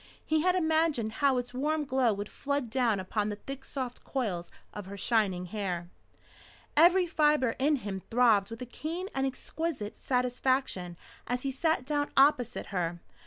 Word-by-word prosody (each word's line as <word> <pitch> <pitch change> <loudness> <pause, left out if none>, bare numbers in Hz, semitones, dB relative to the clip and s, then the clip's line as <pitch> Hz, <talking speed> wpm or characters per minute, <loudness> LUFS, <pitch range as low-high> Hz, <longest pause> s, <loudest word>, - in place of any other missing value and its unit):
He 315 0 +2
had 365 +2 +3
imagined 315 -9 +2
how 275 -2 +4
its 245 0 -3
warm 300 +4 0
glow 260 -3 +2
would 205 0 -3
flood 280 -3 -3
down 235 -5 +2
upon 205 +3 -1
the 205 - -3
thick 270 +5 -8
soft 255 -3 -5
coils 195 -10 -2 0.2
of 205 -2 -7
her 200 +1 -7
shining 195 -4 +1
hair. 180 -3 -4 0.8
Every 350 +4 +6
fibre 300 -7 +2
in 295 +3 +3
him 200 -7 -4
throbbed 225 -5 +4
with 230 +2 -6
a - - -5
keen 330 - -5
and 270 0 +1
exquisite 265 -4 -4
satisfaction 250 -7 0 0.3
as 245 +1 -1
he 275 - -1
sat 315 0 0
down 290 0 0
opposite 270 -4 +4
her. 175 -2 -1
250 Hz, 165 wpm, -30 LUFS, 210-290 Hz, 0.8 s, Every